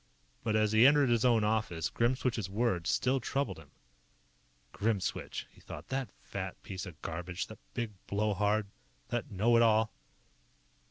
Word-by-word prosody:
But 110 Hz, -1 st, +1 dB
as 110 Hz, -1 st, +3 dB
he 110 Hz, +4 st, +7 dB
entered 145 Hz, -2 st, +5 dB
his 120 Hz, -1 st, +3 dB
own 120 Hz, -4 st, +4 dB
office, 105 Hz, -6 st, 0 dB
Grimswitch's 120 Hz, -4 st, 0 dB
words 100 Hz, -5 st, 0 dB
still 135 Hz, +1 st, +2 dB
troubled 140 Hz, +3 st, -2 dB
him. -, -, -15 dB, 1.0 s
Grimswitch, 105 Hz, -3 st, -1 dB
he -, -, -20 dB
thought. 80 Hz, +4 st, -9 dB
_That 135 Hz, -1 st, -2 dB
fat -, -, -5 dB
piece 95 Hz, 0 st, -5 dB
of 80 Hz, -4 st, -10 dB
garbage. 90 Hz, +2 st, -3 dB
That 110 Hz, -, -12 dB, 0.2 s
big 120 Hz, -3 st, -2 dB, 0.2 s
blow 105 Hz, +1 st, +1 dB
hard. 105 Hz, +2 st, +1 dB, 0.4 s
That 120 Hz, -1 st, -2 dB
know 110 Hz, +4 st, +3 dB
it -, -, +6 dB
all. 110 Hz, -1 st, +4 dB
110 Hz, 155 wpm, -32 LUFS, 100-120 Hz, 1.0 s, he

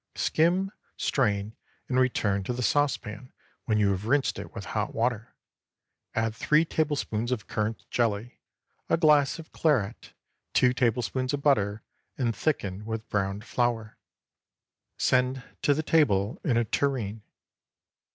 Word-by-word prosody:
Skim, 180 Hz, +4 st, +2 dB, 0.3 s
strain, 105 Hz, -4 st, 0 dB, 0.3 s
and 130 Hz, 0 st, +1 dB
return 105 Hz, -6 st, +1 dB
to 125 Hz, -, -1 dB
the 125 Hz, +1 st, -3 dB
saucepan 125 Hz, -4 st, 0 dB, 0.3 s
when 110 Hz, -2 st, +1 dB
you 100 Hz, -2 st, +3 dB
have 100 Hz, +2 st, -3 dB
rinsed 140 Hz, +2 st, +2 dB
it -, -, -8 dB
with 100 Hz, -, -6 dB
hot 105 Hz, -1 st, -2 dB
water. 115 Hz, 0 st, -1 dB, 0.8 s
Add 115 Hz, 0 st, 0 dB
three 150 Hz, +6 st, +3 dB
tablespoonfuls 140 Hz, -8 st, -1 dB
of 115 Hz, -5 st, -2 dB
currant 110 Hz, +1 st, -3 dB
jelly, 115 Hz, 0 st, -1 dB, 0.5 s
a -, -, +4 dB
glass 150 Hz, -4 st, +4 dB
of 165 Hz, -1 st, -11 dB
claret, 120 Hz, -9 st, 0 dB, 0.4 s
two 125 Hz, -1 st, +5 dB
tablespoonfuls 130 Hz, +2 st, 0 dB
of 140 Hz, -, -8 dB
butter, 105 Hz, -7 st, +2 dB, 0.3 s
and 120 Hz, -4 st, 0 dB
thicken 105 Hz, -10 st, -1 dB
with 110 Hz, 0 st, -5 dB
browned 100 Hz, +1 st, -1 dB
flour. 120 Hz, -4 st, -1 dB, 1.0 s
Send 125 Hz, 0 st, +2 dB, 0.2 s
to 145 Hz, +2 st, +2 dB
table 110 Hz, -10 st, +2 dB
in 125 Hz, -6 st, +2 dB
a 120 Hz, -, +3 dB
tureen. 115 Hz, -5 st, -1 dB
120 Hz, 130 wpm, -27 LUFS, 105-140 Hz, 1.0 s, two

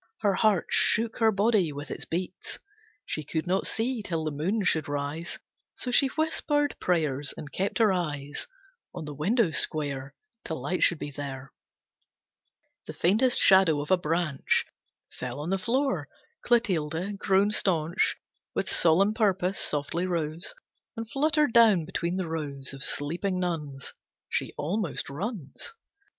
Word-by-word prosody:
Her 205 Hz, -2 st, +3 dB
heart 200 Hz, -2 st, +3 dB
shook 225 Hz, +2 st, +2 dB
her 225 Hz, -1 st, +5 dB
body 200 Hz, -4 st, +2 dB
with 145 Hz, 0 st, -7 dB
its -, -, -5 dB
beats. 180 Hz, +2 st, -4 dB, 0.5 s
She 155 Hz, -, -3 dB
could 160 Hz, +3 st, -2 dB
not 185 Hz, +2 st, 0 dB
see 235 Hz, +1 st, -1 dB
till 165 Hz, -5 st, -2 dB
the 155 Hz, -, -1 dB
moon 185 Hz, +9 st, -1 dB
should 160 Hz, -4 st, +2 dB
rise, 145 Hz, +4 st, -3 dB, 0.4 s
So 250 Hz, -, -3 dB
she 275 Hz, +3 st, +5 dB
whispered 295 Hz, 0 st, 0 dB
prayers 150 Hz, -5 st, 0 dB
and 145 Hz, -, -8 dB
kept 195 Hz, +2 st, -1 dB
her 220 Hz, -4 st, +4 dB
eyes 145 Hz, -5 st, -3 dB, 0.5 s
On 165 Hz, -, -5 dB
the 150 Hz, -, -6 dB
window 185 Hz, -, +2 dB
square 140 Hz, -2 st, -1 dB, 0.3 s
Till 160 Hz, -, -4 dB
light 145 Hz, +8 st, -2 dB
should 170 Hz, -, +5 dB
be 145 Hz, -, -5 dB
there. 135 Hz, -1 st, -7 dB, 1.3 s
The -, -, -6 dB
faintest 220 Hz, +8 st, +3 dB
shadow 190 Hz, -6 st, +6 dB
of 145 Hz, +3 st, -4 dB
a -, -, +8 dB
branch 165 Hz, -4 st, 0 dB, 0.5 s
Fell 125 Hz, +2 st, -5 dB
on 155 Hz, +5 st, -3 dB
the 195 Hz, -, +1 dB
floor. 265 Hz, +7 st, 0 dB, 0.3 s
Clotilde, 190 Hz, -4 st, 0 dB
grown 195 Hz, +1 st, +3 dB
staunch 170 Hz, -4 st, +1 dB, 0.4 s
With -, -, -1 dB
solemn 185 Hz, +6 st, +4 dB
purpose, 195 Hz, -4 st, +1 dB
softly 155 Hz, +5 st, -1 dB
rose 165 Hz, -, -3 dB, 0.4 s
And 225 Hz, 0 st, -4 dB
fluttered 300 Hz, -2 st, +2 dB
down 215 Hz, -8 st, +6 dB
between 170 Hz, +3 st, -2 dB
the 185 Hz, -3 st, -2 dB
rows 140 Hz, -5 st, -4 dB
Of 135 Hz, 0 st, -5 dB
sleeping 175 Hz, +6 st, -1 dB
nuns. 150 Hz, -7 st, -3 dB, 0.4 s
She -, -, -1 dB
almost 170 Hz, -1 st, -2 dB
runs. 170 Hz, -, -6 dB
175 Hz, 145 wpm, -28 LUFS, 150-210 Hz, 1.3 s, a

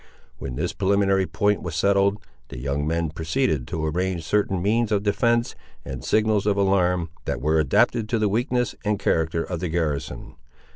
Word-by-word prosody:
When 65 Hz, -2 st, -5 dB
this -, -, -2 dB
preliminary 95 Hz, -1 st, +2 dB
point 105 Hz, 0 st, +1 dB
was 85 Hz, -3 st, -5 dB
settled, 100 Hz, +3 st, +2 dB, 0.3 s
the -, -, -9 dB
young 70 Hz, +3 st, -2 dB
men 85 Hz, -1 st, -1 dB
proceeded 80 Hz, -, -1 dB
to 80 Hz, -1 st, -3 dB
arrange 90 Hz, +2 st, -1 dB
certain 95 Hz, +2 st, 0 dB
means 110 Hz, +4 st, +1 dB
of 100 Hz, -1 st, +1 dB
defence, 115 Hz, +3 st, +1 dB, 0.3 s
and 65 Hz, -2 st, -6 dB
signals 110 Hz, +1 st, +1 dB
of 100 Hz, -1 st, +2 dB
alarm, 90 Hz, -4 st, +2 dB
that -, -, -2 dB
were 80 Hz, +3 st, +2 dB
adapted 105 Hz, +7 st, +2 dB
to 115 Hz, -, +1 dB
the 110 Hz, -1 st, +2 dB
weakness 125 Hz, +3 st, 0 dB
and 105 Hz, -1 st, 0 dB
character 80 Hz, -4 st, 0 dB
of 90 Hz, -3 st, -4 dB
the 90 Hz, 0 st, -3 dB
garrison. 80 Hz, -4 st, -3 dB
95 Hz, 175 wpm, -24 LUFS, 80-105 Hz, 0.3 s, preliminary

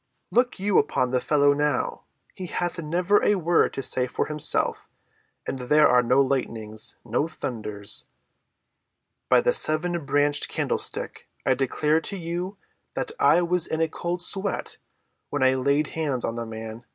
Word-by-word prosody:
"Look 245 Hz, -3 st, +1 dB
you 200 Hz, 0 st, +3 dB
upon 125 Hz, -1 st, 0 dB
the 125 Hz, -1 st, +1 dB
fellow 145 Hz, -1 st, +3 dB
now, 145 Hz, -2 st, -1 dB, 0.3 s
he 185 Hz, -, -7 dB
hath 175 Hz, 0 st, -3 dB
never 175 Hz, +6 st, +1 dB
a 205 Hz, -, +3 dB
word 175 Hz, -2 st, +2 dB
to 135 Hz, -, -3 dB
say 125 Hz, 0 st, +3 dB
for -, -, -2 dB
himself, 150 Hz, -1 st, +1 dB, 0.6 s
and 135 Hz, -, -4 dB
there 150 Hz, +5 st, +4 dB
are 125 Hz, 0 st, +4 dB
no 125 Hz, +3 st, +3 dB
lightnings—no 115 Hz, 0 st, -1 dB
thunders. 105 Hz, -9 st, -2 dB, 1.2 s
By -, -, +5 dB
the -, -, +2 dB
seven‐branched 155 Hz, -, +1 dB
candlestick, -, -, -3 dB, 0.2 s
I -, -, +4 dB
declare 150 Hz, +4 st, 0 dB
to 200 Hz, -, -3 dB
you 175 Hz, +3 st, -5 dB, 0.4 s
that -, -, -3 dB
I 175 Hz, -, +4 dB
was 175 Hz, 0 st, +2 dB
in 160 Hz, -, -3 dB
a 165 Hz, -, +2 dB
cold 175 Hz, +2 st, -4 dB
sweat 195 Hz, +1 st, -1 dB, 0.5 s
when 145 Hz, -2 st, -1 dB
I 130 Hz, 0 st, +4 dB
laid 140 Hz, +3 st, +1 dB
hands 145 Hz, -6 st, -2 dB
on 115 Hz, -, -2 dB
the 115 Hz, 0 st, -5 dB
man. 110 Hz, +1 st, -8 dB
150 Hz, 150 wpm, -25 LUFS, 125-175 Hz, 1.2 s, By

